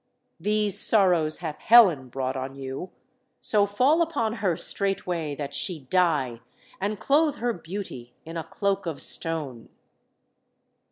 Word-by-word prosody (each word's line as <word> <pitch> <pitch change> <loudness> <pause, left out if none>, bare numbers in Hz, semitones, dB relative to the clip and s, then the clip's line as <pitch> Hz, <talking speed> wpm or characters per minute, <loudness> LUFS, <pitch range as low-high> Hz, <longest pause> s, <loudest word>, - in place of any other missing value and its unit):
"These 210 +2 +1
sorrows 180 -9 +3
hath 155 -2 -5
Helen 185 - +6
brought 130 +1 -3
on 130 +1 -5
you. 135 +6 -6 0.5
So 205 -2 +2
fall 260 +11 +3
upon 285 -10 0
her 180 -6 +1
straightway, 175 -6 -1
that 140 -1 -6
she 165 +1 0
die, 150 -10 +1 0.4
and 205 +1 -2
clothe 290 +5 +2
her 240 0 -1
beauty 165 - -8
in 165 +1 -8
a 165 - -3
cloak 200 0 -2
of 160 -4 -4
stone!" 150 -8 -3
180 Hz, 130 wpm, -25 LUFS, 145-210 Hz, 0.5 s, Helen